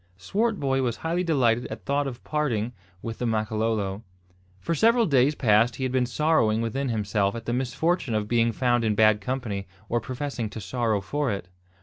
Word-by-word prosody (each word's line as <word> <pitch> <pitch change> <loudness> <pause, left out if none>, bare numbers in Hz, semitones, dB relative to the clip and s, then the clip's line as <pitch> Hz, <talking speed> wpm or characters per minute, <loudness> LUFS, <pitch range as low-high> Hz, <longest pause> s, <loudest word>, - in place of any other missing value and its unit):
Swartboy 140 - 0
was 120 -3 0
highly 170 +2 0
delighted 125 -8 +2
at - - -8
thought 140 0 0
of 125 -3 -7
parting 125 -7 -1 0.3
with 115 -1 -5
the 125 - -1
Makololo. 110 -2 -1 0.6
For 100 - -2
several 230 +8 +4
days 140 -2 +3
past 115 -1 +3
he 130 - -5
had 130 - 0
been 125 -1 +1
sorrowing 125 -5 +2
within 130 +4 -2
himself 105 -2 0
at 115 -1 -7
the 120 - -1
misfortune 130 +2 0
of 105 -1 -1
being 115 0 +2
found 120 0 +1
in 110 -2 +1
bad 110 -1 +4
company, 105 -4 -3 0.2
or 120 0 +1
professing 130 -2 -4
to 110 - -7
sorrow 110 -1 -1
for 140 +7 -1
it. 100 -2 -5
120 Hz, 185 wpm, -26 LUFS, 110-135 Hz, 0.6 s, several